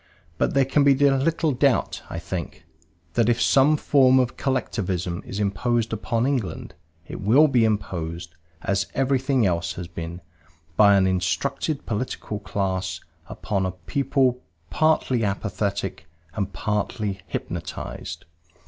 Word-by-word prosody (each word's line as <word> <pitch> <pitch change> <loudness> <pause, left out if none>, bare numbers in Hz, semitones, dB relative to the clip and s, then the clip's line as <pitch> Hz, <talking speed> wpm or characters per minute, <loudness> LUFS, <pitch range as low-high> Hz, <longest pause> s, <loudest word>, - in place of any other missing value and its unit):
But - - +1
there 135 -1 +4
can 140 +2 +2
be 140 -1 +6
little 145 +4 +2
doubt, 135 -1 +1
I - - -5
think, 85 0 -6 0.5
that 115 +1 +3
if 120 0 +2
some 140 +5 +4
form 130 -3 +4
of 125 -2 0
Collectivism 95 -9 -2
is 100 - -5
imposed 115 +3 0
upon 115 +2 -1
England 130 -7 -2 0.3
it - - -7
will 125 +10 +5
be 125 -5 +3
imposed, 85 -6 -2 0.3
as 100 0 0
everything 135 -2 +2
else 85 -3 0
has 85 0 -6
been, 85 +1 -7 0.5
by 100 -1 +6
an 95 -1 +4
instructed 135 - -1
political 110 -2 -3
class 95 -2 -2 0.3
upon 100 -3 -2
a 95 -1 -2
people 130 +4 0 0.3
partly 145 - +2
apathetic 100 -4 -2 0.3
and 100 -2 -2
partly 105 +1 -2
hypnotized. - - -6
110 Hz, 130 wpm, -24 LUFS, 95-130 Hz, 0.5 s, be